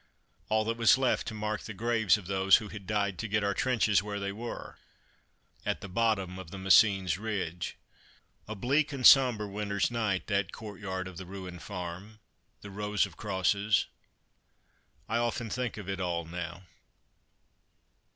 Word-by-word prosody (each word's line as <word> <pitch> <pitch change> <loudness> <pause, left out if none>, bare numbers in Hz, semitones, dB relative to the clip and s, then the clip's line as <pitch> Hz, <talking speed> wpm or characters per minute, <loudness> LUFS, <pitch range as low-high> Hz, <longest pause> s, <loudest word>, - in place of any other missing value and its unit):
All 110 0 +2
that 115 +1 -1
was 115 +2 +6
left 130 -1 +1
to 110 - -4
mark 105 0 -2
the 110 - -8
graves 115 -1 +2
of 105 - -11
those 95 0 +4
who 105 - -1
had 100 -3 -9
died 100 -2 0
to 115 - -3
get 105 0 0
our 100 0 +1
trenches 115 -6 +2
where 100 0 -4
they 100 0 -3
were 115 +4 -7 0.8
at - - -2
the - - -6
bottom 95 -3 0
of 95 -3 -9
the 100 - -8
Messines 95 -1 +4
ridge. 95 -6 -3 0.7
A 110 - -5
bleak 140 +8 +1
and 135 -3 -3
sombre 125 -6 +7
winter's 100 +1 -1
night, 105 -7 -1
that 100 -3 0
courtyard 95 -3 -6
of 90 -2 -10
the 95 - -7
ruined 90 -2 -8
farm, 95 +2 -7 0.4
the 100 - -9
rows 105 0 0
of - - -12
crosses 100 +1 +1 1.2
I 115 - 0
often 120 -1 -1
think 125 -3 -2
of 105 -4 -8
it 95 -1 -3
all 85 -2 -2
now. 85 +1 -6
100 Hz, 165 wpm, -30 LUFS, 95-110 Hz, 1.2 s, sombre